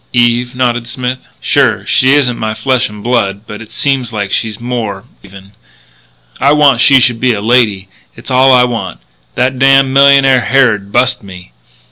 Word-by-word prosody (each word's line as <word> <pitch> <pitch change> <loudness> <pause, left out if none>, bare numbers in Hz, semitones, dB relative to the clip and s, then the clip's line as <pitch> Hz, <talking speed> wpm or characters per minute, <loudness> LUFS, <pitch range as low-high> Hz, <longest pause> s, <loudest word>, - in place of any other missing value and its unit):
"Eve," 120 +1 0
nodded 120 -2 -2
Smith. 125 +1 -4 0.2
"Sure. - - 0
She 130 +1 +2
isn't 130 -4 0
my 110 0 -3
flesh 130 -3 -1
and 105 -1 -12
blood. 100 -5 -1
But 105 +1 -10
it 115 - -12
seems 135 -4 -2
like 100 -3 -5
she's 110 0 -3
more, 115 -5 -5 0.2
even. 95 0 -15 0.9
I 140 +2 +2
want 145 -5 +3
she 135 -2 +5
should 120 -2 0
be 125 0 +1
a 105 - -4
lady. 105 -3 +1 0.3
It's 120 +3 -10
all 130 +1 +4
I 125 -1 +5
want. 115 -6 -4 0.4
That 130 +1 -1
damned 135 0 +3
millionaire 135 -2 +4
Harrod 110 -8 0
bust 125 +1 +1
me. 95 -3 -13
120 Hz, 170 wpm, -11 LUFS, 105-130 Hz, 0.9 s, she